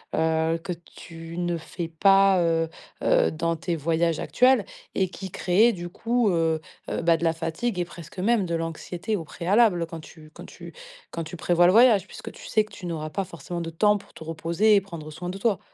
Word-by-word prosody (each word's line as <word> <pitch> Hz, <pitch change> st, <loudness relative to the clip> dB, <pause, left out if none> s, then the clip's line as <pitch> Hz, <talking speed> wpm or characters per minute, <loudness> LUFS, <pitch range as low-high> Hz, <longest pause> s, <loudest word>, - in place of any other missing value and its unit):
heu, 160 Hz, 0 st, +1 dB
que 180 Hz, -, -3 dB
tu 165 Hz, 0 st, -11 dB
ne 175 Hz, -1 st, -1 dB
fais 165 Hz, +1 st, -6 dB
pas, 195 Hz, +3 st, +4 dB
heu 165 Hz, -1 st, +1 dB, 0.3 s
heu, -, -, +3 dB
dans 165 Hz, +1 st, -1 dB
tes 170 Hz, +1 st, -3 dB
voyages 165 Hz, +1 st, 0 dB
actuels 255 Hz, +1 st, +3 dB, 0.3 s
et 190 Hz, -, +2 dB
qui 190 Hz, 0 st, -8 dB
créaient, 205 Hz, +9 st, +3 dB
du 175 Hz, -2 st, -6 dB
coup, 230 Hz, +4 st, 0 dB
heu 165 Hz, -3 st, +1 dB, 0.3 s
heu, -, -, -2 dB
bah, 165 Hz, 0 st, +4 dB
de 165 Hz, -, -6 dB
la 165 Hz, -, +3 dB
fatigue 165 Hz, +6 st, -3 dB
et 175 Hz, -, 0 dB
presque 170 Hz, 0 st, -11 dB, 0.2 s
même 210 Hz, +1 st, +2 dB
de 170 Hz, -1 st, -2 dB
l'anxiété 165 Hz, +5 st, -3 dB
au 175 Hz, -, -4 dB
préalable, 180 Hz, +1 st, +2 dB
quand 165 Hz, 0 st, -8 dB
tu 155 Hz, 0 st, -14 dB
quand -, -, -11 dB
tu -, -, -11 dB, 0.4 s
quand 165 Hz, -, -4 dB
tu 160 Hz, +3 st, -8 dB
prévois 175 Hz, +1 st, +3 dB
le -, -, +6 dB
voyage 230 Hz, -3 st, +6 dB
puisque -, -, -9 dB
tu -, -, -12 dB
sais 215 Hz, -, +3 dB
que 215 Hz, -, -17 dB
tu 185 Hz, -, -9 dB
n'auras 155 Hz, -2 st, -4 dB
pas 195 Hz, -, -1 dB
forcément 170 Hz, +1 st, -6 dB
de 165 Hz, -, -4 dB
temps 210 Hz, +6 st, +3 dB
pour -, -, -19 dB
te -, -, -10 dB
reposer 165 Hz, +6 st, +2 dB
et 200 Hz, -, +4 dB
prendre 170 Hz, -5 st, -9 dB
soin 175 Hz, +4 st, -6 dB
de 185 Hz, -, -5 dB
toi. 200 Hz, -1 st, +1 dB
170 Hz, 215 wpm, -25 LUFS, 165-195 Hz, 0.4 s, le